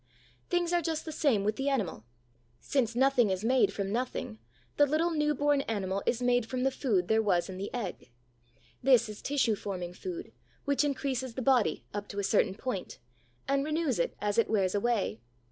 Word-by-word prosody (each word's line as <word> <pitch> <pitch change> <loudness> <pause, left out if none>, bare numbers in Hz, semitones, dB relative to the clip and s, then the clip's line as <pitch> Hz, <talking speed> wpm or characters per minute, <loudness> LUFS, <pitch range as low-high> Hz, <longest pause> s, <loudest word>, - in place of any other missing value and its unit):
Things 350 0 +1
are 350 - +3
just 320 -1 -2
the 320 - -5
same 275 -10 +2
with 215 +1 0
the 270 +1 0
animal. 200 - -2 0.5
Since 235 - 0
nothing 255 -3 +4
is 190 +2 -2
made 255 +1 +4
from 195 -1 -3
nothing, 235 - -3 0.4
the 290 - +5
little 320 +4 +1
new 300 -2 +1
born 290 +1 +2
animal 195 -3 -1
is 245 0 +1
made 245 -2 +2
from 255 0 -2
the 270 - +2
food 210 -10 0
there 220 0 +3
was 190 -4 +1
in 185 0 -6
the 200 - -4
egg. 205 - -5 0.7
This 250 -3 +5
is 210 -1 -8
tissue 270 -6 +1
forming 180 -4 -5
food 350 - -6 0.3
which 280 0 +2
increases 260 -3 -2
the 260 - -3
body, 245 - +2
up 205 0 -4
to 200 - -9
a - - -1
certain 195 -1 +2
point, 215 -5 -4 0.5
and 275 0 +2
renews 305 - 0
it 170 - 0
as 205 +2 0
it 230 - +2
wears 195 -4 +1
away. 205 - 0
240 Hz, 195 wpm, -30 LUFS, 200-275 Hz, 0.7 s, the